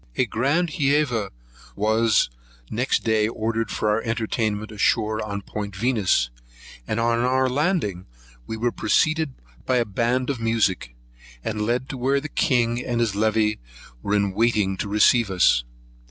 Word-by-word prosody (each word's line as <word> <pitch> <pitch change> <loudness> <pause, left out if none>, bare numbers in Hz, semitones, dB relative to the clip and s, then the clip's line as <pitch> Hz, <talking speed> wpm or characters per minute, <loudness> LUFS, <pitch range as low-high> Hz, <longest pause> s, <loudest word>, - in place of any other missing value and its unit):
A - - +2
grand 145 +9 0
Hæva 140 - +1 0.5
was 110 - +2 0.4
next 125 +4 0
day 110 -1 +2
ordered 115 0 -2
for 105 - 0
our 105 +2 +1
entertainment 110 -2 -2
ashore, 110 +1 +1
on 100 -1 -5
Point 100 -1 -6
Venus, 100 - +1 0.6
and 110 - -1
on 115 0 +1
our 130 +2 +2
landing 130 - -1 0.4
we 110 - -4
were 120 +2 0
preceded 155 0 +1 0.3
by 130 - +2
a 120 - +2
band 120 +5 0
of 130 - -5
music, 105 - 0 0.5
and 105 -1 -3
led 125 +2 0
to 135 - -5
where 135 +3 +2
the 150 +2 -7
king 120 -3 +1
and 120 -2 -2
his 115 -3 +1
levee 110 0 +1 0.4
were 100 - 0
in 100 -2 +1
waiting 105 -3 +1
to 100 - -3
receive 105 +2 +4
us. 90 -10 +3
115 Hz, 155 wpm, -23 LUFS, 105-125 Hz, 0.6 s, receive